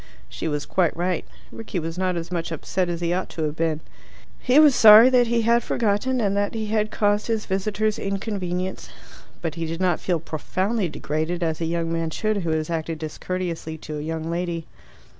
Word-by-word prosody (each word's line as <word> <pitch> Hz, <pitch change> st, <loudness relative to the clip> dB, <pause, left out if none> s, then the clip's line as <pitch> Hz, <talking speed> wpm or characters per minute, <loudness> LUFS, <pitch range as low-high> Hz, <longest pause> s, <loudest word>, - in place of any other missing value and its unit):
She -, -, -5 dB
was 150 Hz, -1 st, -2 dB
quite 175 Hz, -4 st, +1 dB
right. 180 Hz, -1 st, -1 dB, 0.3 s
Rickie 225 Hz, -4 st, -6 dB
was 165 Hz, -1 st, -3 dB
not 185 Hz, -1 st, 0 dB
as 170 Hz, +1 st, -5 dB
much 170 Hz, -2 st, -3 dB
upset 175 Hz, +3 st, -2 dB
as 170 Hz, 0 st, -3 dB
he 170 Hz, 0 st, 0 dB
ought 185 Hz, +1 st, -2 dB
to 160 Hz, -, -4 dB
have 150 Hz, -1 st, -2 dB
been. 160 Hz, -1 st, -1 dB, 0.6 s
He 255 Hz, +2 st, +2 dB
was 300 Hz, -2 st, +8 dB
sorry 220 Hz, +2 st, +9 dB
that 245 Hz, -2 st, +4 dB
he 230 Hz, 0 st, +1 dB
had 235 Hz, +1 st, +4 dB
forgotten, 235 Hz, +4 st, 0 dB
and 200 Hz, -3 st, +1 dB
that 205 Hz, +2 st, 0 dB
he 220 Hz, -1 st, -2 dB
had 215 Hz, -1 st, +1 dB
caused 205 Hz, 0 st, +1 dB
his 225 Hz, -2 st, -1 dB
visitors 210 Hz, +2 st, -1 dB
inconvenience. 190 Hz, -2 st, -3 dB, 0.5 s
But 165 Hz, -3 st, -2 dB
he 165 Hz, 0 st, -4 dB
did 165 Hz, +1 st, -4 dB
not 180 Hz, -3 st, +1 dB
feel 175 Hz, -3 st, 0 dB
profoundly 185 Hz, +6 st, -2 dB
degraded, 160 Hz, +4 st, -2 dB
as 160 Hz, 0 st, -1 dB
a -, -, +1 dB
young 165 Hz, 0 st, -1 dB
man 165 Hz, -1 st, -1 dB
should 215 Hz, +6 st, -1 dB
who 170 Hz, -4 st, -2 dB
has 155 Hz, -1 st, 0 dB
acted 165 Hz, 0 st, -2 dB
discourteously 160 Hz, +1 st, -4 dB
to 150 Hz, -1 st, -6 dB
a -, -, -4 dB
young 160 Hz, +1 st, -3 dB
lady. 170 Hz, -1 st, -2 dB
180 Hz, 200 wpm, -24 LUFS, 165-210 Hz, 0.6 s, sorry